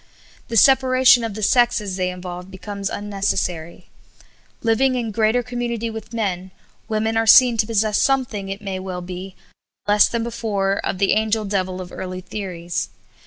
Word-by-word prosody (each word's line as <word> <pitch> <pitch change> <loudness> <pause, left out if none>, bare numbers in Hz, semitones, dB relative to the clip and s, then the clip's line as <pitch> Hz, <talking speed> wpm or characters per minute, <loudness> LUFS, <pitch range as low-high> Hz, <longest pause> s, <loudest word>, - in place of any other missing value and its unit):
The 230 - -1
separation 260 -1 +5
of 225 -3 -4
the 215 - -5
sexes 225 -4 +2
they 185 -1 -1
involve 180 0 -7
becomes 200 +1 -5
unnecessary. 195 -5 -3 0.8
Living 255 +3 +2
in 235 -3 -2
greater 220 +3 +1
community 235 -2 -3
with 220 0 -8
men, 190 -5 -2 0.4
women 220 +1 0
are 225 0 +1
seen 245 +1 +7
to 215 -1 +1
possess 215 -2 +1
something, 245 -8 0
it 195 +2 -6
may 195 -2 -4
well 185 -1 -5
be, 185 +1 -8 0.5
but - - 0
less 210 0 +5
than 235 -1 -2
before, 210 -4 -1
of - - -2
the 195 +1 +2
angel 220 0 +1
devil 185 -2 -2
of 180 -1 -8
early 185 0 -6
theories. 175 -4 -5
210 Hz, 165 wpm, -21 LUFS, 190-230 Hz, 0.8 s, seen